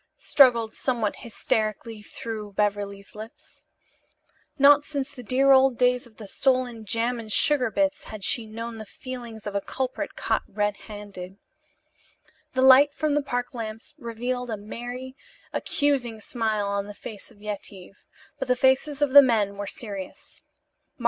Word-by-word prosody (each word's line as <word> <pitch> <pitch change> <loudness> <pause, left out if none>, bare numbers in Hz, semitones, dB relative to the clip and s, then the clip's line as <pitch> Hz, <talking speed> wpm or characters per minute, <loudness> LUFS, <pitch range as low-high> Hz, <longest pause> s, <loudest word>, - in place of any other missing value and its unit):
struggled 235 -5 +4
somewhat 235 -5 -1
hysterically 220 0 -2
through 215 0 -6
Beverly's 200 -1 -2
lips. 215 +2 -12 0.9
Not 285 +1 +7
since 280 -2 -4
the 250 - -9
dear 265 +4 +3
old 265 -2 +5
days 250 0 +2
of 220 - -23
the 215 - -9
stolen 250 0 0
jam 230 +3 0
and 220 -2 -8
sugar 255 +1 +3
bits 290 +4 0
had 215 -2 -8
she 225 +1 0
known 230 +1 -6
the 220 - -7
feelings 240 -4 -8
of 205 - -4
a 200 - 0
culprit 260 +5 -4
caught - - 0
red 205 0 -1
handed. 200 -3 -8 1.2
The 260 - +3
light 275 +2 +7
from 305 -1 0
the 295 - +2
park 245 -3 -3
lamps 225 +3 -7
revealed 245 +1 -3
a 220 - -2
merry, 245 +5 -7 0.4
accusing 260 -6 0
smile 215 -2 -1
on 200 0 -2
the 205 - -9
face 205 -1 -9
of 225 -4 -20
Yetive, 200 -2 -6 0.4
but 270 - -3
the 250 - +3
faces 270 +3 +2
of 285 - +1
the 285 +1 +11
men 215 -6 +2
were 200 0 -5
serious. 200 -5 -7
230 Hz, 155 wpm, -25 LUFS, 210-260 Hz, 1.2 s, the